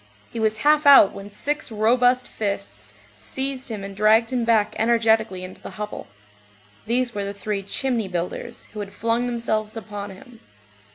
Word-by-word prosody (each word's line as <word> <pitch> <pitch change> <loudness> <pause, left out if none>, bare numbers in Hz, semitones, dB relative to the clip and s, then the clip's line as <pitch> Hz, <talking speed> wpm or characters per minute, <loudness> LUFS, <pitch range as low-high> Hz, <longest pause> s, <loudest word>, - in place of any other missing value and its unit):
He 230 - -5
was 220 0 +1
half 300 0 +4
out 275 -8 +9
when 200 +1 -9
six 290 +7 -3
robust 245 +3 +3
fists 150 - -5 0.2
seized 265 - -3
him 210 -3 -5
and 195 0 -7
dragged 220 +4 +3
him 245 -2 +1
back 225 -3 +2
energetically 220 -4 +2
into 185 0 -10
the - - -10
hovel. 210 0 -6 0.8
These 245 +1 0
were 205 - -3
the 200 0 -5
three 200 0 -3
"chimney 230 +2 -1
builders," 180 -1 -5
who 215 - -7
had 200 -1 -6
flung 230 +2 0
themselves 225 -2 -2
upon 205 -1 -6
him. 230 +5 -14
220 Hz, 165 wpm, -23 LUFS, 200-240 Hz, 0.8 s, out